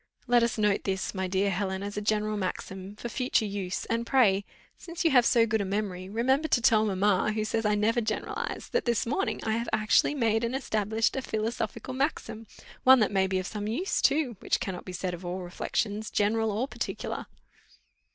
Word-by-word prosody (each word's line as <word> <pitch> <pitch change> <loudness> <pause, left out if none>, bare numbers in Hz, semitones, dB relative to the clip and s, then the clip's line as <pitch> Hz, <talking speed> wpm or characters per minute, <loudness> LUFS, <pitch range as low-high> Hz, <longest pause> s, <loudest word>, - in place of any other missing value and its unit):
Let 245 -1 +4
us 235 -1 0
note 210 -2 +2
this, 190 -1 -2
my 190 -1 -2
dear 195 +2 +1
Helen, 190 +1 -2
as 205 0 -5
a 210 - -2
general 215 0 0
maxim, 190 0 -5
for 230 - -6
future 250 -1 0
use, 195 -3 -3
and 230 +1 -1
pray, 210 -6 +3 0.3
since 340 0 -6
you 325 - +5
have 245 -3 +5
so 230 -2 +4
good 220 -1 0
a - - 0
memory, 190 -2 -3
remember 265 +8 +1
to 260 - +3
tell 220 -2 +4
mamma, 200 +1 +2
who 215 0 -1
says 225 +1 -1
I 210 - +2
never 225 +3 +2
generalise, 215 -1 -3
that 480 - 0
this 235 -3 +1
morning 285 +12 -1
I 220 - -1
have 230 +1 -1
actually 215 +6 +3
made 225 -4 +1
and 235 +2 -1
established 220 -4 0
a 265 - -1
philosophical 225 +2 -3
maxim, 235 -5 -2 0.4
one 260 0 +8
that 210 -3 +2
may 190 -1 +2
be 190 0 0
of 185 - -2
some 210 +1 -4
use 315 - -1
too, 275 -7 +2
which - - 0
cannot 185 -2 -5
be 185 - -6
said 180 0 -3
of 175 +1 -7
all 180 +1 -4
reflections, 205 +4 -2
general 220 +2 +1
or 225 +6 -1
particular." - - -5
215 Hz, 205 wpm, -28 LUFS, 195-235 Hz, 0.4 s, one